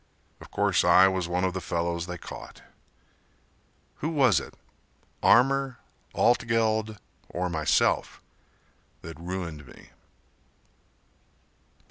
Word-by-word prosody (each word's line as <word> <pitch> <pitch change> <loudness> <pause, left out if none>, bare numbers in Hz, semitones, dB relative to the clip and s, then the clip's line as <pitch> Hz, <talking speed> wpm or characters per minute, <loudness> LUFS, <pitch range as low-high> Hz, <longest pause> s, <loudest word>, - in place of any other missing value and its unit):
Of - - -12
course - - +1
I 95 +1 +6
was 95 -2 -1
one 90 +1 -1
of 95 -1 0
the 95 - -4
fellows 85 0 -2
they 90 -1 -6
caught. - - -11 1.3
Who 155 - -3
was 130 - +3
it, - - -11 0.7
Armour, 135 0 +3 0.4
Altgeld 110 -2 +1 0.3
or 90 0 -3
myself 80 -3 +1 0.8
That 80 -1 -9
ruined 85 -5 -6
me? - - -16
95 Hz, 100 wpm, -26 LUFS, 85-115 Hz, 1.3 s, I